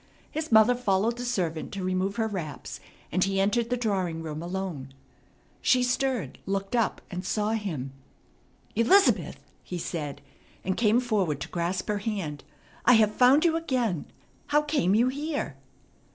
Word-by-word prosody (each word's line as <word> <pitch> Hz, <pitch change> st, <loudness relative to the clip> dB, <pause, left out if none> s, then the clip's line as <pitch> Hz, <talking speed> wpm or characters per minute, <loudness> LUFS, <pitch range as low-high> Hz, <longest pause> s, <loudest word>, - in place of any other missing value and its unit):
His 315 Hz, -2 st, -4 dB
mother 220 Hz, +2 st, +7 dB
followed 230 Hz, -1 st, +1 dB
the -, -, -3 dB
servant 170 Hz, -9 st, -2 dB
to 195 Hz, -2 st, -4 dB
remove 185 Hz, +2 st, 0 dB
her 225 Hz, -1 st, 0 dB
wraps, 175 Hz, -8 st, -6 dB, 0.3 s
and 185 Hz, -, +2 dB
he 195 Hz, 0 st, 0 dB
entered 225 Hz, +4 st, +1 dB
the 250 Hz, -, 0 dB
drawing 185 Hz, -8 st, -1 dB
room 155 Hz, -1 st, -5 dB
alone. 170 Hz, -7 st, -5 dB, 0.7 s
She 250 Hz, -1 st, +4 dB
stirred, 250 Hz, -, -1 dB
looked 195 Hz, +3 st, -2 dB
up, 230 Hz, -2 st, +1 dB
and 180 Hz, 0 st, -4 dB
saw 210 Hz, +3 st, 0 dB
him. 165 Hz, -, -3 dB, 0.8 s
"Elizabeth!" 310 Hz, -, +4 dB, 0.3 s
he 180 Hz, -, -5 dB
said, 155 Hz, -4 st, -4 dB, 0.5 s
and 190 Hz, 0 st, 0 dB
came 225 Hz, 0 st, +3 dB
forward 200 Hz, -, 0 dB
to -, -, -5 dB
grasp 175 Hz, +2 st, -2 dB
her 210 Hz, -1 st, 0 dB
hand. 195 Hz, -9 st, -4 dB, 0.4 s
"I 245 Hz, -, +6 dB
have 215 Hz, -2 st, +5 dB
found 260 Hz, +7 st, +5 dB
you 325 Hz, -1 st, +3 dB
again. 250 Hz, -, -1 dB, 0.4 s
How 295 Hz, +1 st, +3 dB
came 285 Hz, -, +2 dB
you 240 Hz, +3 st, +4 dB
here?" 285 Hz, -, -3 dB
205 Hz, 155 wpm, -27 LUFS, 180-245 Hz, 0.8 s, mother